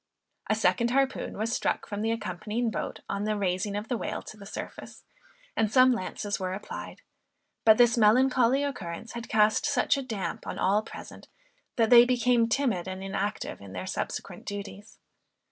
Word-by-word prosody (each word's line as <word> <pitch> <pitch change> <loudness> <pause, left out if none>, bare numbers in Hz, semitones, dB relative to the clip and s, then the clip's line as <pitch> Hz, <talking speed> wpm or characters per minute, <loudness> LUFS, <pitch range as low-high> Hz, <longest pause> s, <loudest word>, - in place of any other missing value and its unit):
A 215 - +3
second 235 +1 +2
harpoon 270 +1 0
was 220 +3 -1
struck - - -1
from 205 -1 -4
the 225 - 0
accompanying 220 +2 -2
boat - - -4
on 200 +1 -2
the 215 0 0
raising 195 +1 -1
of 210 +2 -4
the 245 - -1
whale - - -4
to - - -10
the 200 -2 -12
surface, - - -8 0.5
and 215 -2 +1
some 255 +2 +6
lances 205 -1 -3
were 185 -1 -2
applied, 205 - -8 0.6
but 220 -1 +7
this 240 -1 +5
melancholy 255 +4 +4
occurrence 220 -6 -5
had 235 0 -7
cast 215 -1 +3
such 285 0 +2
a - - -2
damp 220 -7 -5
on - - -4
all 200 +3 +2
present, - - -11 0.5
that 225 -1 +2
they 240 -1 +10
became 245 -1 +2
timid 225 -9 0
and 185 0 -5
inactive 195 - -3
in 100 -1 -11
their 95 0 -5
subsequent - - -5
duties. 205 +1 -7
220 Hz, 175 wpm, -28 LUFS, 200-240 Hz, 0.6 s, they